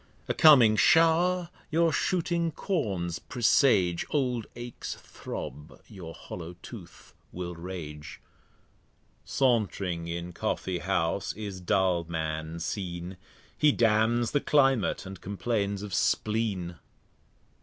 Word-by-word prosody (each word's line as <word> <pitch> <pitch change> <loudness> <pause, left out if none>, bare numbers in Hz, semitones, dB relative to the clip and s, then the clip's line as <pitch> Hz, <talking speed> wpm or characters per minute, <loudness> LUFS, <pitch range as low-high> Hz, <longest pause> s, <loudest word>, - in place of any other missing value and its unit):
A - - 0
coming 130 -9 +7
Show'r 170 +4 +4 0.2
your 165 0 +2
shooting 170 -1 0
Corns 100 - -2
presage, 110 - +3
Old 125 -6 0
Aches 120 0 -6
throb, 75 +1 -8
your 90 -7 -9
hollow 85 0 -8
Tooth - - -12 0.2
will 90 -1 -5
rage. 85 -4 -7 1.1
Sauntring 100 -9 0
in 85 +1 -5
Coffee 90 +1 -2
house 95 +1 -1
is 100 -3 -6
Dulman 85 -3 -1
seen; 90 0 -4 0.4
He 150 -1 +4
damns 115 0 +2
the 145 - +1
Climate, 135 -9 +2
and 95 0 -9
complains 100 0 -2
of 100 -3 -7
Spleen. 100 -4 0
100 Hz, 100 wpm, -28 LUFS, 85-125 Hz, 1.1 s, coming